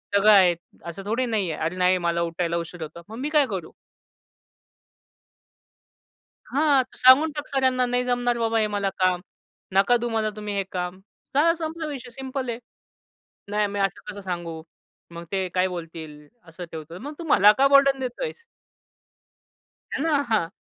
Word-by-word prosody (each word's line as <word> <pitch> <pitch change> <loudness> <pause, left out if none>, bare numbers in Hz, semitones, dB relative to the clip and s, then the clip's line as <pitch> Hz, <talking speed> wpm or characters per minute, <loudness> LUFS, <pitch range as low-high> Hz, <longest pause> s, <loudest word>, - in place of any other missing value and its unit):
सगळं 210 +2 +6
आहे. 185 -4 +6 0.3
असं 170 +3 -7
थोडी 235 +5 0
नाही 210 -7 -1
आहे!" 150 - -6
"अरे 175 +3 -2
नाही, 185 0 +3
मला 170 0 +1
उठायला 170 0 -1
उशीर 170 0 -6
होतो." 170 +2 -9
"मग 225 - -8
मी 290 +3 -2
काय 300 -3 +4
करू?" 180 -5 -5 2.8
हां, 285 -2 +4
"तू 255 - -20
सांगून 270 +5 +6
टाक 295 0 -5
सरांना, 260 -2 +2
'नाही 245 0 0
जमणार 245 -1 +1
बाबा 225 0 +1
हे 215 - +2
मला 200 -1 -1
काम. 180 -1 +2 0.5
नका 220 +5 +5
देऊ 240 0 -3
मला 220 -1 0
तुम्ही 210 -1 -5
हे 195 - 0
काम.'" 180 0 -4 0.4
झाला, 330 +3 +5
संपला 320 0 -4
विषय 260 -4 -7
सिंपल 265 0 -5
आहे. 230 0 -4 0.9
"नाही 210 0 +1
मी 200 0 -4
असं 195 -2 -1
कसं 200 +1 -9
सांगू? 170 -3 -5 0.5
मग 170 0 -8
ते 190 -1 -1
काय 185 +1 +3
बोलतील? 160 -4 -8 0.2
असं 175 +1 -9
ठेवतो." 160 +2 -8
"मग 290 +4 -7
तू - - -5
मला 205 +2 +7
का 275 +1 +5
बर्डन 275 -1 +5
देतोयस?" 460 - -5 1.5
हे - - -2
ना? 300 -3 +2
हां. 210 -7 +2
210 Hz, 170 wpm, -24 LUFS, 180-260 Hz, 2.8 s, मला